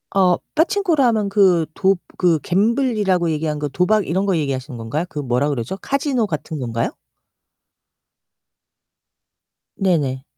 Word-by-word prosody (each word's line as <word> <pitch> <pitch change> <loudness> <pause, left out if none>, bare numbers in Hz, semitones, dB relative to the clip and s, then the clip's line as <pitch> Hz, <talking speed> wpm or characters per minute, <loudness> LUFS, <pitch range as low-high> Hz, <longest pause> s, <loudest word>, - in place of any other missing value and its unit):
어 185 -2 +4 0.2
빠칭코라 335 -3 +2
하면 215 -3 +1
그 190 -5 +4
도 195 0 +3 0.2
그 170 -4 +3
갬블이라고 205 - +1
얘기하는거 150 -1 -2
도박 190 +6 +1
이런거 190 +2 +1
얘기하시는 135 -4 -3
건가요? 115 +9 -3
그 155 - -6
뭐라 135 +1 0
그러죠? 135 +6 -3
카지노 270 0 -1
같은건가요? 130 - -3 2.9
네네. 145 -9 0
180 Hz, 285 characters per minute, -20 LUFS, 145-210 Hz, 2.9 s, 어